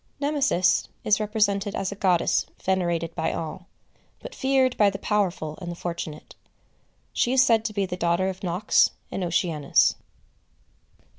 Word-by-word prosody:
Nemesis 285 Hz, -, +1 dB, 0.2 s
is 215 Hz, 0 st, +3 dB
represented 205 Hz, -2 st, 0 dB
as 195 Hz, 0 st, -2 dB
a -, -, -5 dB
goddess 185 Hz, -4 st, +1 dB, 0.2 s
venerated 175 Hz, -3 st, 0 dB
by 160 Hz, 0 st, -1 dB
all, 165 Hz, +3 st, -6 dB, 0.5 s
but -, -, -9 dB
feared 265 Hz, -, +1 dB
by 205 Hz, -1 st, +4 dB
the 195 Hz, -, -5 dB
powerful 185 Hz, -7 st, -1 dB
and 175 Hz, -, -5 dB
the -, -, -6 dB
fortunate. 170 Hz, -3 st, -6 dB, 0.8 s
She 245 Hz, -, +1 dB
is 260 Hz, 0 st, +6 dB
said 225 Hz, -3 st, +3 dB
to 215 Hz, -, -2 dB
be 200 Hz, -1 st, 0 dB
the 180 Hz, -1 st, -5 dB
daughter 170 Hz, +2 st, +1 dB
of 190 Hz, -1 st, -5 dB
Nox 180 Hz, +3 st, +2 dB, 0.2 s
and 190 Hz, -, -3 dB
Oceanus. 165 Hz, -4 st, +2 dB
190 Hz, 150 wpm, -25 LUFS, 170-215 Hz, 0.8 s, is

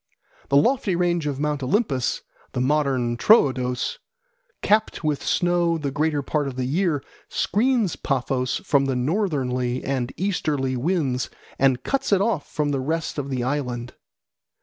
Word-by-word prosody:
The 140 Hz, -, +4 dB
lofty 205 Hz, -, +2 dB
range 175 Hz, -3 st, +1 dB
of 140 Hz, -2 st, -3 dB
Mount 150 Hz, -1 st, -1 dB
Olympus 135 Hz, -, 0 dB, 0.3 s
(the -, -, -2 dB
modern 130 Hz, -3 st, +1 dB
Troodos), 130 Hz, -, +3 dB, 0.6 s
capped 215 Hz, -4 st, +2 dB
with 150 Hz, -2 st, 0 dB
snow 175 Hz, -1 st, +2 dB
the 145 Hz, -3 st, -3 dB
greater 150 Hz, 0 st, 0 dB
part 145 Hz, +1 st, -1 dB
of 135 Hz, -, -5 dB
the 130 Hz, -1 st, -2 dB
year, 155 Hz, 0 st, 0 dB, 0.3 s
screens 225 Hz, -1 st, +1 dB
Paphos 130 Hz, -2 st, -1 dB
from 140 Hz, -1 st, +3 dB
the 135 Hz, -1 st, 0 dB
northerly 130 Hz, -, -1 dB
and 130 Hz, -2 st, -2 dB
easterly 150 Hz, -9 st, -1 dB
winds 135 Hz, -3 st, 0 dB, 0.3 s
and 130 Hz, -2 st, +3 dB
cuts 275 Hz, -5 st, -1 dB
it 200 Hz, -, +5 dB
off 195 Hz, -7 st, -1 dB
from 150 Hz, -1 st, 0 dB
the 140 Hz, -, 0 dB
rest 160 Hz, +2 st, -2 dB
of 140 Hz, -1 st, -4 dB
the 130 Hz, -2 st, -1 dB
island. 125 Hz, -3 st, -3 dB
145 Hz, 150 wpm, -23 LUFS, 130-175 Hz, 0.6 s, it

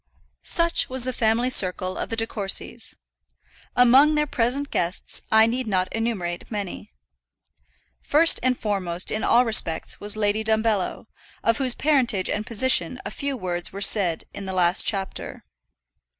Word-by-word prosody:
Such 335 Hz, 0 st, +1 dB
was 260 Hz, -1 st, 0 dB
the 255 Hz, 0 st, -1 dB
family 235 Hz, +3 st, +1 dB
circle 185 Hz, -3 st, +1 dB
of -, -, -4 dB
the 225 Hz, -, -3 dB
De 225 Hz, 0 st, +1 dB
Courcys. 200 Hz, -4 st, -3 dB, 0.8 s
Among 265 Hz, +5 st, +5 dB
their 300 Hz, 0 st, +2 dB
present 275 Hz, +2 st, -1 dB
guests 175 Hz, +2 st, -2 dB
I 220 Hz, 0 st, +6 dB
need 245 Hz, +2 st, -2 dB
not 185 Hz, -3 st, -1 dB
enumerate 205 Hz, -7 st, -3 dB
many. 205 Hz, -1 st, -6 dB, 1.1 s
First 325 Hz, +3 st, +4 dB
and 250 Hz, 0 st, +1 dB
foremost 185 Hz, -4 st, -2 dB
in 215 Hz, -, -2 dB
all 245 Hz, +1 st, +4 dB
respects 170 Hz, -8 st, -1 dB
was 205 Hz, +1 st, -2 dB
Lady 210 Hz, +1 st, 0 dB
Dumbello, 220 Hz, -3 st, 0 dB, 0.4 s
of 230 Hz, +2 st, +1 dB
whose 255 Hz, -3 st, 0 dB
parentage 250 Hz, -10 st, +1 dB
and 215 Hz, +1 st, -3 dB
position 240 Hz, -2 st, +3 dB
a 205 Hz, -, -5 dB
few 280 Hz, +3 st, -4 dB
words 175 Hz, -4 st, -3 dB
were 195 Hz, -, -7 dB
said 195 Hz, -4 st, +2 dB
in 200 Hz, -, -7 dB
the 190 Hz, -, -5 dB
last 180 Hz, -1 st, +2 dB
chapter. 195 Hz, -3 st, -3 dB
220 Hz, 150 wpm, -23 LUFS, 190-250 Hz, 1.1 s, I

